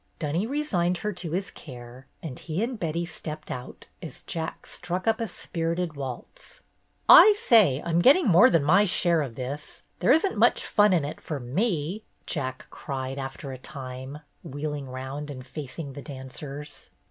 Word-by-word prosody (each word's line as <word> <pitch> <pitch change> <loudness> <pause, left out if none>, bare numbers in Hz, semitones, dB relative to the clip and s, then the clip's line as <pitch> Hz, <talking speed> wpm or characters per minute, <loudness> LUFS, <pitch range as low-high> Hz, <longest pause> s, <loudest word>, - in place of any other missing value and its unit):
Dunny 165 +7 -1
re 290 +4 -1
signed 180 - +1
her 210 +4 -3
to 180 -2 -4
his 185 +5 -2
care, 125 -1 -11 0.2
and 140 -6 -6
he 170 +5 -2
and 240 -1 -3
Betty 170 +1 -1
stepped 155 -2 -7
out 125 0 -7 0.2
as - - -9
Jack 160 -1 -5
struck 180 +3 -4
up 225 0 +2
a 225 - -1
spirited 170 -2 -3
waltz. 135 - -8 0.4
"I 425 -1 +10
say, 215 - +4
I'm 170 0 +2
getting 280 - +6
more 175 -3 +7
than 165 -4 +3
my 190 +8 +5
share 175 -3 +2
of 130 -6 -5
this. 140 +4 -6 0.2
There - - +3
is 320 +7 +5
n't 385 - -2
much - - +4
fun 210 -1 +4
in 170 -6 +2
it 145 - -6
for 150 -3 -4
me," 170 - -1 0.2
Jack 130 -5 -3
cried, 135 -1 -5
after 135 +1 -6
a 130 - -8
time, 130 +1 -8 0.2
wheeling 145 -2 -5
round 130 +3 -6
and 130 -3 -8
facing 140 +1 -7
the 140 - -8
dancers. 140 +1 -8
155 Hz, 175 wpm, -26 LUFS, 135-180 Hz, 0.4 s, I